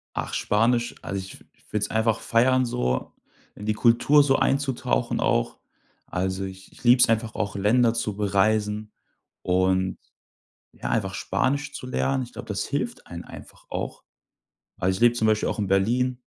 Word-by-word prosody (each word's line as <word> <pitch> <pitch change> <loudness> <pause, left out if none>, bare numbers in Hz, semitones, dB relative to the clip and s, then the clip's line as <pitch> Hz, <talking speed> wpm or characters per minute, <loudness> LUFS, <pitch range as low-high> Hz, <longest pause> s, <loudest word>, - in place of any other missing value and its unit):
Ach - - -3
Spanisch, 120 +3 +1
also, 100 - -4
ich 95 0 -9 0.3
würde 105 -1 0
es - - -2
einfach 110 -1 +1
feiern 130 +2 +3
so, 65 - -2 0.4
in 105 - -9
die 110 - +1
Kultur 120 +6 +4
so 135 -1 +3
einzutauchen 135 -2 0
auch. - - 0 0.5
Also, 95 +1 -2
ich 95 0 -10
ich - - -18
liebe 125 +1 +6
es - - +6
einfach 115 0 0
auch, 100 - -2
Länder 115 +4 +3
zu 110 -3 -2
bereisen 105 +1 0 0.5
und, 95 0 +1 0.8
ja, - - -6
einfach 95 -4 -1
Spanisch 140 +11 -1
zu 125 - -7
lernen. 130 +1 0
Ich 120 - -14
glaube, - - -8
das 100 -2 -2
hilft 235 +12 -3
einen 85 0 -8
einfach - - -13
auch. - - -4 0.7
Also, 95 +1 0
ich - - -8
lebe 120 0 +5
zum 110 -2 +1
Beispiel 110 -1 +2
auch - - -3
in 105 - 0
Berlin. 120 +6 +1
110 Hz, 170 wpm, -25 LUFS, 95-125 Hz, 0.8 s, liebe